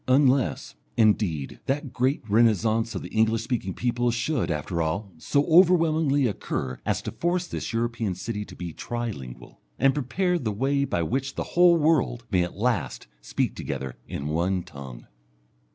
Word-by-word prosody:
Unless, 130 Hz, 0 st, +2 dB, 0.2 s
indeed, 100 Hz, -, +1 dB
that 140 Hz, -1 st, -2 dB
great 130 Hz, +3 st, +1 dB
renascence 110 Hz, +1 st, +2 dB
of 95 Hz, -, -4 dB
the -, -, -7 dB
English 110 Hz, 0 st, +2 dB
speaking 115 Hz, -7 st, -2 dB
peoples 120 Hz, -1 st, 0 dB
should, 120 Hz, -, -1 dB
after 85 Hz, +2 st, -2 dB
all, 95 Hz, +6 st, -2 dB
so 140 Hz, -, +1 dB
overwhelmingly 160 Hz, -5 st, +4 dB
occur 65 Hz, -, -3 dB
as -, -, 0 dB
to -, -, -4 dB
force 175 Hz, +1 st, -1 dB
this 140 Hz, -, -5 dB
European 115 Hz, -4 st, -1 dB
city 105 Hz, +3 st, -4 dB
to -, -, -12 dB
be 85 Hz, -2 st, -6 dB
tri 120 Hz, +4 st, -3 dB
lingual, 65 Hz, -, -10 dB, 0.2 s
and 135 Hz, +2 st, +4 dB
prepare 175 Hz, +6 st, 0 dB
the 110 Hz, -8 st, -2 dB
way 140 Hz, +6 st, +1 dB
by 85 Hz, -, -1 dB
which 135 Hz, -, -2 dB
the -, -, -2 dB
whole 175 Hz, -1 st, +6 dB
world 150 Hz, -7 st, +1 dB
may 95 Hz, -3 st, +3 dB
at 90 Hz, +1 st, -3 dB
last 120 Hz, +2 st, -1 dB, 0.2 s
speak -, -, -1 dB
together 65 Hz, -2 st, -5 dB
in 70 Hz, -, -5 dB
one 85 Hz, +4 st, 0 dB
tongue. 70 Hz, -5 st, -10 dB
115 Hz, 165 wpm, -26 LUFS, 95-140 Hz, 0.2 s, whole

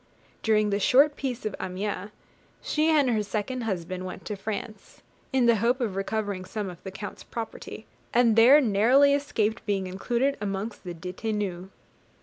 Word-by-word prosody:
During 215 Hz, -2 st, +2 dB
the 200 Hz, -, +1 dB
short 280 Hz, +7 st, +5 dB
peace 255 Hz, -5 st, -4 dB
of 215 Hz, -, -2 dB
Amiens, 190 Hz, +1 st, -4 dB, 0.5 s
she 310 Hz, +1 st, +1 dB
and 290 Hz, -5 st, +4 dB
her 220 Hz, -2 st, +1 dB
second 220 Hz, +4 st, -3 dB
husband 185 Hz, -2 st, -3 dB
went 185 Hz, -1 st, -7 dB
to 210 Hz, -, -3 dB
France, 215 Hz, +2 st, -7 dB, 0.3 s
in 260 Hz, -2 st, +3 dB
the 235 Hz, -1 st, +5 dB
hope 240 Hz, +5 st, +1 dB
of 220 Hz, -7 st, -2 dB
recovering 200 Hz, -1 st, -2 dB
some 200 Hz, 0 st, -4 dB
of 175 Hz, -, -14 dB
the 190 Hz, -, -7 dB
Count's 200 Hz, +1 st, -8 dB
property, 225 Hz, -1 st, -7 dB, 0.3 s
and 235 Hz, -2 st, +4 dB
there 245 Hz, +6 st, +8 dB
narrowly 255 Hz, +5 st, +4 dB
escaped 230 Hz, -6 st, 0 dB
being 195 Hz, -2 st, 0 dB
included 240 Hz, +9 st, -1 dB
amongst 200 Hz, +1 st, -4 dB
the 175 Hz, -1 st, -5 dB
detenus. 185 Hz, +1 st, -4 dB
215 Hz, 160 wpm, -27 LUFS, 195-245 Hz, 0.5 s, there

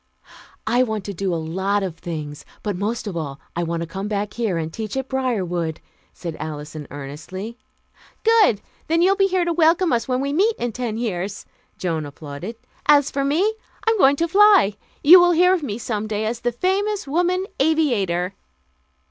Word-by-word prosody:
"I 240 Hz, +3 st, +3 dB
want 220 Hz, -5 st, -1 dB
to 200 Hz, -, -5 dB
do 190 Hz, +1 st, -2 dB
a -, -, 0 dB
lot 190 Hz, +5 st, -1 dB
of 180 Hz, -4 st, -4 dB
things, 155 Hz, -4 st, -6 dB, 0.2 s
but 205 Hz, -3 st, -2 dB
most 215 Hz, +6 st, -2 dB
of 200 Hz, -4 st, -5 dB
all, 145 Hz, -4 st, -4 dB, 0.2 s
I 170 Hz, -, -1 dB
want 170 Hz, 0 st, -2 dB
to -, -, -6 dB
come 190 Hz, +4 st, -5 dB
back 210 Hz, 0 st, -2 dB
here 220 Hz, -7 st, -1 dB
and 160 Hz, 0 st, -4 dB
teach 220 Hz, +2 st, -4 dB
at 265 Hz, 0 st, -2 dB
Briarwood," 185 Hz, -12 st, -1 dB, 0.3 s
said 170 Hz, -3 st, -6 dB
Alison 150 Hz, -1 st, -6 dB
earnestly. 160 Hz, -, -7 dB, 0.6 s
"Good! 435 Hz, -, +4 dB, 0.3 s
Then 330 Hz, +2 st, +3 dB
you'll 385 Hz, +2 st, +4 dB
be 390 Hz, -1 st, +3 dB
here 370 Hz, -2 st, +1 dB
to 340 Hz, -, 0 dB
welcome 330 Hz, +1 st, +3 dB
us 230 Hz, -2 st, 0 dB
when 255 Hz, -1 st, 0 dB
we 280 Hz, +1 st, -1 dB
meet 420 Hz, +8 st, +3 dB
in 240 Hz, 0 st, -2 dB
ten 230 Hz, -1 st, -3 dB
years," 205 Hz, -4 st, -3 dB, 0.3 s
Joan 160 Hz, -4 st, -2 dB
applauded. 145 Hz, +8 st, -8 dB, 0.3 s
"As 290 Hz, -2 st, +5 dB
for 275 Hz, -, -1 dB
me, 340 Hz, +10 st, +2 dB, 0.3 s
I'm 450 Hz, -2 st, +3 dB
going 275 Hz, -2 st, +6 dB
to 335 Hz, +4 st, 0 dB
fly.... 395 Hz, -, +6 dB, 0.3 s
You 350 Hz, +5 st, +10 dB
will 350 Hz, 0 st, +5 dB
hear 360 Hz, +2 st, +5 dB
of 365 Hz, -, 0 dB
me 220 Hz, -8 st, -3 dB
some 220 Hz, -2 st, -3 dB
day 215 Hz, 0 st, -2 dB
as 230 Hz, +2 st, -2 dB
the 245 Hz, 0 st, -1 dB
famous 385 Hz, -, -1 dB
woman 355 Hz, +5 st, +1 dB
aviator." 225 Hz, -, +1 dB
225 Hz, 190 wpm, -22 LUFS, -, 0.6 s, You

